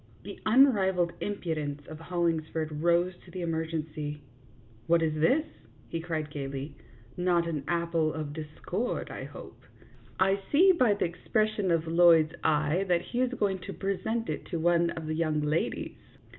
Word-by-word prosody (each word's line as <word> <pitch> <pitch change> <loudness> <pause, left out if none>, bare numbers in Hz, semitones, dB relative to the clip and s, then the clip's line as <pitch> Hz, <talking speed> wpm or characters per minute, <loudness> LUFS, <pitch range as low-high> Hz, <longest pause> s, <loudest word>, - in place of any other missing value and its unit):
The - - -8
unrivalled 195 -8 +4
impudence 155 -8 -3
of 155 0 -9
Hollingsford 160 -3 -2
rose 175 +2 +3
to - - -16
the 185 - -6
emergency. 160 -3 -3 0.3
" 115 -1 -27
What 165 0 +4
is 155 -1 +1
this? 255 - +2 0.2
" - - -27
he 165 - -2
cried, 160 -3 -3
gayly. 140 0 -5 0.4
"Not 175 -1 +2
an 155 -4 -3
apple 170 -2 +1
of 155 -2 -5
discord, 160 +8 -4
I - - -6
hope. - - -11 0.6
I 195 +1 +3
see 365 +6 +7
by 250 - +3
the - - 0
expression 210 +3 0
of 165 -1 +2
Lloyd's 165 -1 +5
eye 155 +4 +2
that 175 -1 +2
he 245 - +1
is 255 0 0
going 195 -4 0
to 185 - -7
present 205 +4 -2
it - - -3
to 170 - -4
one 170 +1 +3
of 165 -1 -5
the 155 - -2
young 155 -1 0
ladies." 150 +2 -1
170 Hz, 165 wpm, -29 LUFS, 155-190 Hz, 0.6 s, see